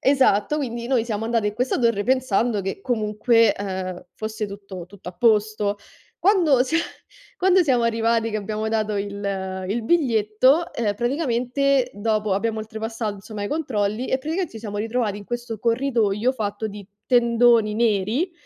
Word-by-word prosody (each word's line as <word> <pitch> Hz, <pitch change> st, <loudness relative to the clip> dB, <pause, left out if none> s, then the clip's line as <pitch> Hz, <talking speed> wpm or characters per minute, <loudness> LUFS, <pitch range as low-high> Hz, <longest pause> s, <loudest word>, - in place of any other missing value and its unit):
Esatto, 265 Hz, -2 st, +3 dB
quindi 240 Hz, -5 st, -3 dB
noi 245 Hz, -3 st, +1 dB
siamo 220 Hz, -2 st, -3 dB
andato 230 Hz, -2 st, 0 dB
in 210 Hz, -, -2 dB
questa 250 Hz, +4 st, 0 dB
torre 230 Hz, -4 st, +2 dB
pensando 245 Hz, -3 st, +1 dB
che 195 Hz, +1 st, -4 dB
comunque, 225 Hz, 0 st, +2 dB
ehm, 185 Hz, -2 st, -5 dB
fosse 215 Hz, 0 st, -4 dB
tutto 195 Hz, -3 st, -9 dB
tutto 190 Hz, -1 st, -11 dB
a -, -, -7 dB
posto. 210 Hz, +1 st, +2 dB, 0.4 s
Quando 345 Hz, -10 st, +4 dB
sia 320 Hz, +5 st, +1 dB, 0.6 s
quando 375 Hz, 0 st, +4 dB
siamo 255 Hz, -7 st, +2 dB
arrivati 230 Hz, 0 st, +1 dB
che 215 Hz, -, -2 dB
abbiamo 215 Hz, +1 st, -3 dB
dato 215 Hz, -1 st, -1 dB
il 200 Hz, -2 st, -3 dB
il 225 Hz, +4 st, -1 dB
biglietto, 260 Hz, +3 st, +2 dB
ehm, 210 Hz, -3 st, 0 dB
praticamente 255 Hz, +1 st, 0 dB
dopo 215 Hz, 0 st, -1 dB
abbiamo 220 Hz, +3 st, -1 dB
oltrepassato 220 Hz, +1 st, -4 dB
insomma 205 Hz, +1 st, -8 dB
i -, -, -3 dB
controlli 235 Hz, -6 st, -1 dB
e -, -, +1 dB
praticamente 320 Hz, +5 st, -3 dB
ci 225 Hz, -, -8 dB
siamo 210 Hz, -2 st, -5 dB
ritrovati 220 Hz, -1 st, -1 dB
in 205 Hz, -, -11 dB
questo 240 Hz, 0 st, -5 dB
corridoio 230 Hz, -1 st, +1 dB
fatto 220 Hz, -3 st, -3 dB
di 205 Hz, -1 st, -9 dB, 0.2 s
tendoni 235 Hz, -3 st, +4 dB
neri. 225 Hz, -, +1 dB
225 Hz, 155 wpm, -23 LUFS, 205-250 Hz, 0.6 s, Quando